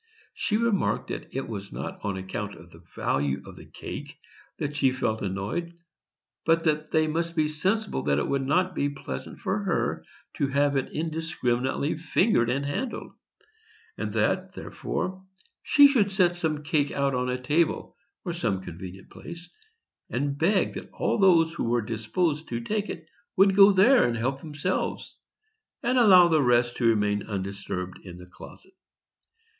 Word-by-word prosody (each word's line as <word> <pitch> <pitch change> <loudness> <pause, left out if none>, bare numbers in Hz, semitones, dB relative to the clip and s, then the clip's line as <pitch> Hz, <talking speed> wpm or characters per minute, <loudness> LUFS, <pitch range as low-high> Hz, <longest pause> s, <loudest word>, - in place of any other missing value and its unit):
She 210 - 0
remarked 230 -4 0
that - - -6
it 135 - -2
was 100 -3 -6
not - - -6
on 100 -2 -2
account 100 +2 -5
of 85 +1 -15
the 80 - -15
value 70 0 -1
of - - -11
the - - -13
cake - - -8 0.4
that 145 0 -3
she 135 -3 +3
felt 115 -4 -1
annoyed, 105 - -3 0.7
but 165 +1 +3
that 155 -1 0
they 155 0 +3
must 165 +2 -2
be 155 -2 +2
sensible 185 - -1
that 70 -1 +2
it - - 0
would 140 -1 0
not 180 +7 +1
be 145 -4 0
pleasant 100 - -7
for - - -1
her - - -1 0.3
to 140 - +1
have 140 +1 +1
it 135 - -1
indiscriminately 155 -3 -1
fingered 160 - +2
and 140 +3 0
handled, 230 - -4 0.8
and - - -4
that, - - 0
therefore, 185 0 -4 0.4
she 285 -1 +7
should 235 -8 +2
set 185 -3 +2
some 155 -3 -2
cake 150 -2 +1
out 140 -1 0
upon 125 0 -1
a 125 0 -1
table, 150 +6 0 0.3
or 175 - -2
some 115 - -1
convenient 95 +2 -9
place, 170 +1 -10 0.6
and 140 +3 -1
beg 185 +7 +2
that - - -8
all - - 0
those 170 -4 +5
who 170 - -3
were 120 0 +1
disposed 145 - -1
to 115 - -2
take 210 - -2
it 165 - -6 0.3
would 195 0 +5
go 200 0 +8
there 220 +7 +6
and 115 -1 -1
help 135 +4 -1
themselves, 155 +4 -3 0.7
and 250 +2 +2
allow 185 -6 +8
the 160 -3 +3
rest 120 -2 +3
to 120 - +2
remain 105 -2 +1
undisturbed 95 -2 -4
in 90 -2 -10
the 90 - -11
closet. 370 - -14
145 Hz, 165 wpm, -26 LUFS, 115-175 Hz, 0.8 s, go